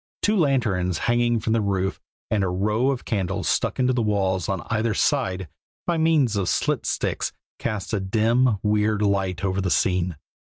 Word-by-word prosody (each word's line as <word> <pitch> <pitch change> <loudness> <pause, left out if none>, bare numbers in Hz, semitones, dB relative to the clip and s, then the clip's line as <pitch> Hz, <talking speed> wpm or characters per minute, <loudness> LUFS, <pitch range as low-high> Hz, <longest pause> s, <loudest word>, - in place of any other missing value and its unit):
Two 215 - +3
lanterns 110 - +1
hanging 120 +1 +1
from 110 - -1
the 115 - +2
roof 95 -2 -1 0.3
and 105 -3 +2
a - - +1
row 105 +7 +1
of 135 -3 -2
candles 95 -2 -2
stuck - - 0
into 130 0 +2
the 125 - 0
wall 95 -3 +1
on 95 - -3
either 110 -1 0
side 95 -1 0 0.4
by 170 -2 0
means 155 -8 +3
of 100 -3 0
slit - - 0
sticks - - -1 0.3
cast 105 0 -3
a 105 - +1
dim, 110 +4 +2
weird 105 0 +1
light 95 -2 0
over 95 0 0
the 95 - -1
scene. 90 -1 +1
105 Hz, 175 wpm, -24 LUFS, 95-120 Hz, 0.4 s, Two